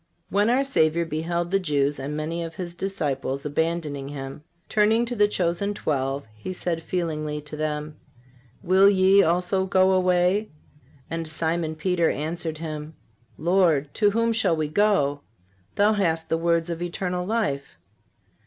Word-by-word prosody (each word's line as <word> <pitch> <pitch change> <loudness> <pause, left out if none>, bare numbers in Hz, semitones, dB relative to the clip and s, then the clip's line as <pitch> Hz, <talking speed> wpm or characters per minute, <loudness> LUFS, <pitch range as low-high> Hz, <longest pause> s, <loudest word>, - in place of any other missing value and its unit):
When 205 +3 +3
our 255 +3 +3
Savior 170 - +2
beheld 170 +2 -2
the 195 - +3
Jews 145 -5 0
and 145 +3 -4
many 165 +2 -3
of 165 -1 -7
His 175 -2 -5
disciples 145 -8 -3
abandoning 150 -2 -2
Him, 140 0 -7 0.2
turning 220 +2 +3
to 245 +1 -4
the 205 -2 +4
chosen 195 +1 -1
twelve, 135 -3 -2
He 110 +13 -6
said 170 -2 -3
feelingly 155 -4 -2
to 150 +1 -8
them: 150 0 -3 0.7
"Will 190 +2 +6
ye 195 0 +5
also 180 +3 +1
go 185 0 +4
away? 185 +3 +2 0.6
And 165 -1 -4
Simon 160 0 -2
Peter 170 +1 +1
answered 160 +2 -3
Him: 155 -1 -6 0.4
Lord, 165 -4 +2
to 210 -2 +3
whom 230 +2 +1
shall 195 -6 +2
we 155 -1 -2
go? 155 -6 +2 0.5
Thou 210 +2 +4
hast 165 -5 0
the - - +2
words 170 0 +1
of 170 0 -5
eternal 180 +1 -2
life." 180 -10 -2
170 Hz, 150 wpm, -25 LUFS, 155-190 Hz, 0.7 s, Will